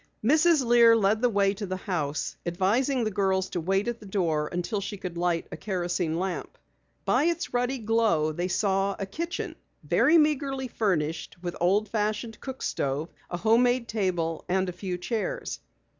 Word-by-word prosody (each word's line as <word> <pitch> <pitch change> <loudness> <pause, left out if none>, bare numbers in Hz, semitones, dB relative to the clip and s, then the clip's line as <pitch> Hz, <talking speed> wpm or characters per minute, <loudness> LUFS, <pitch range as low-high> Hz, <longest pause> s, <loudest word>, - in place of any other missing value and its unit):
Mrs. 310 +1 +4
Lear 235 -1 +7
led 215 0 +2
the 245 - +4
way 200 -2 +2
to 205 0 -5
the 185 0 -3
house, 155 -7 -2
advising 220 +9 +1
the 215 - -1
girls 190 -2 0
to 175 - -2
wait 195 +5 0
at 240 -1 -2
the 210 - -12
door 165 -6 0
until 180 +4 -2
she 200 +1 -5
could 180 -2 -6
light 170 -1 0
a - - -6
kerosene 175 -4 -1
lamp. 185 +1 -4 0.5
By - - +3
its 340 0 -1
ruddy 245 +2 0
glow 220 -9 +2
they 175 +3 -2
saw 195 +1 +1
a 195 - -3
kitchen, 335 - -4 0.3
very 330 - +4
meagerly 280 -4 +1
furnished 165 -9 -1
with 175 -1 -3
old 200 +5 +3
fashioned 215 +1 -2
cook 265 -1 -7
stove, 140 +5 -2 0.2
a 175 - -3
homemade 235 +4 +3
table 175 -7 -1
and 190 +1 +1
a - - -2
few 180 0 -4
chairs. 235 - -3
200 Hz, 175 wpm, -27 LUFS, 180-235 Hz, 0.5 s, Lear